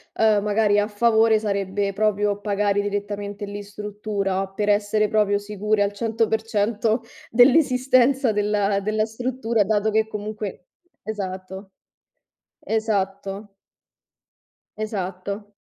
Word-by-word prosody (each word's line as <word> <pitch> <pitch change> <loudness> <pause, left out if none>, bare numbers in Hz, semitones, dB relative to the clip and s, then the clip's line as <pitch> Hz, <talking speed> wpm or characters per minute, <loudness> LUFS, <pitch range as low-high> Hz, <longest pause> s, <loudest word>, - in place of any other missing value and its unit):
uhm, 215 -2 +3
magari 205 0 +2
a 205 - +1
favore, 220 +1 +3
sarebbe 200 -1 -1
proprio 205 0 0
pagare 205 -1 0
direttamente 205 0 -3
lì 205 0 -6
in 205 - -7
struttura, 200 -2 -3
per 205 +2 -2
essere 205 +1 +2
proprio 210 -2 +2
sicuri 210 +1 -1
al 200 0 +2
100% 220 0 0 0.3
dell'esistenza 255 -1 +4
della 205 -1 +1
della 215 +2 0
struttura, 230 -2 -1
dato 215 +1 +1
che 220 0 +2
comunque 210 -3 -6 0.4
esatto. 190 -2 -6 0.9
Esatto. 200 -2 -2 1.2
Esatto. 200 0 -5
210 Hz, 105 wpm, -23 LUFS, 200-220 Hz, 1.2 s, dell'esistenza